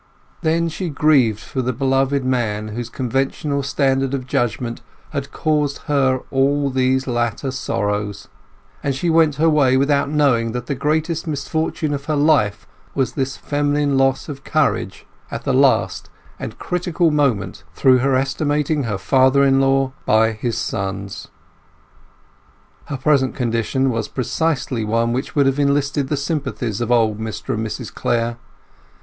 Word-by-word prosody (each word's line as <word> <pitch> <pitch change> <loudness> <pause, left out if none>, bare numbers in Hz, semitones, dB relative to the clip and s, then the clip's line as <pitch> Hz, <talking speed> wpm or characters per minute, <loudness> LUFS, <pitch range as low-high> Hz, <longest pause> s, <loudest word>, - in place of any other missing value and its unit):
Then 165 +1 +1
she 170 +2 -4
grieved 140 -8 +3
for 130 - -4
the 125 0 -1
beloved 135 +1 +1
man 110 -5 -1
whose 115 +2 -5
conventional 135 +3 -1
standard 135 -1 +1
of 130 -2 -5
judgement 120 -1 -2 0.3
had 140 -2 -4
caused 150 -3 -1
her 130 -3 +1
all 140 +1 +2
these 130 0 +1
latter 120 +1 -1
sorrows; 105 -5 -2 0.5
and 140 -2 -1
she 170 +5 0
went 160 -3 +4
her 160 +3 +2
way 140 -5 +4
without 140 +1 +2
knowing 130 -7 +2
that 125 0 -4
the 140 - -2
greatest 155 +4 -1
misfortune 155 +1 -2
of 140 0 -4
her 155 - 0
life 145 -8 +2 0.3
was 135 -2 +1
this 135 -1 -2
feminine 145 -1 0
loss 135 -1 +2
of 140 -3 -7
courage 155 -1 0 0.2
at - - -5
the - - 0
last - - +2 0.3
and - - -6
critical 175 -2 0
moment 115 -12 0
through 130 -1 +5
her 135 +1 +2
estimating 145 +2 0
her 105 -3 -2
father 130 +7 +3
in 135 0 +4
law 135 0 +2 0.2
by 110 +1 +4
his 115 +2 -3
sons. 100 -1 -4 1.6
Her 140 - -4
present 130 -1 +2
condition 125 +2 0
was 115 -2 -2
precisely 130 -2 -1
one 115 +2 +1
which 130 +2 -3
would 140 -2 +4
have 135 +1 +1
enlisted 140 0 +1
the 150 - -1
sympathies 140 -7 -3
of 120 0 -1
old 110 -3 +2
Mr 110 -6 -4
and 110 - -2
Mrs 110 - -5
Clare. 115 0 -1
135 Hz, 150 wpm, -20 LUFS, 120-145 Hz, 1.6 s, through